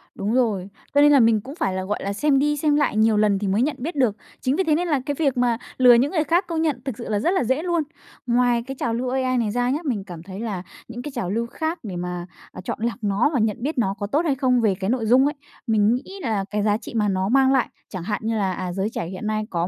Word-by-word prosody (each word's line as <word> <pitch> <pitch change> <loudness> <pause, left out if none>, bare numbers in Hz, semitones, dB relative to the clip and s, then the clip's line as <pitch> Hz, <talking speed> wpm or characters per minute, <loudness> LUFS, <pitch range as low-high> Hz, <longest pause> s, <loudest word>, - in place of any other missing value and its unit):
Đúng 205 +3 -2
rồi. 215 -7 +1 0.3
Cho 285 - +6
nên 295 0 +7
là 285 - +6
mình 225 -2 +4
cũng 270 +7 -9
phải 195 - -1
là, 185 0 -2
gọi 205 +2 -2
là, 200 +1 -2
xem 275 +4 +2
đi 295 +1 +1
xem 295 0 +2
lại 290 -7 +1
nhiều 220 -1 +4
lần 205 -2 +3
thì 205 - -2
mới 195 +4 +1
nhận 285 +3 +1
biết 300 +6 -4
được. 250 -7 +2 0.3
Chính 260 +2 +1
vì 380 - +1
thế 310 -3 +2
nên 350 +3 -1
là 295 -5 +2
cái 290 - -2
việc 275 -5 +1
mà 245 -2 +2 0.2
lừa 250 -1 +7
những 255 +5 +3
người 315 -5 +1
khác 340 +5 +1
công 330 -2 -1
nhận 295 -7 0
thực 260 -5 -4
sự 235 - -7
là 210 -1 +1
rất 340 - +1
là 380 - +1
dễ 260 +7 0
luôn. 345 -3 +1 0.4
Ngoài 240 -1 +2
cái 270 - -5
trào 230 - -1
lưu 250 +2 -2
AI 255 0 0
này 225 -3 0
ra 245 +2 0
nhá, 280 +4 0
mình 220 -8 -1
cảm 175 -4 -9
thấy 190 +2 -8
là 205 -6 -4 0.2
những 240 +1 -7
cái 295 - -6
trào 230 -8 -2
lưu 230 +4 -1
khác 320 +7 -3
để 195 -5 -6
mà, 175 0 -4 0.3
à, - - -9
chọn - - -4
lọc 230 -1 -1
nó 205 +5 +2
và 265 - +2
nhận 215 -2 +1
biết 280 +6 -3
nó 195 -5 +1
có 205 - -2
tốt 290 +9 +1
hay 285 -4 +2
không 255 -2 +2
về 210 -4 +2
cái 190 +1 -3
nội 240 -1 0
dung 250 +5 +5
ấy, 295 +2 0 0.3
mình 220 +1 +3
nghĩ 295 +9 -7
là 215 - -1
cái 210 0 -1
giá 210 -1 +2
trị 225 - -10
mà 210 -2 +2
nó 190 0 0
mang 265 +2 +4
lại, 260 -3 +2 0.2
chẳng 185 -4 -6
hạn 210 +2 -2
như 225 +1 -1
là, 195 -3 0
à, 180 -1 -4
giới 195 +3 -1
trẻ 170 - -4
hiện 185 +4 -6
nay 215 0 0
có 170 -3 -1
235 Hz, 300 wpm, -23 LUFS, 205-275 Hz, 0.4 s, nên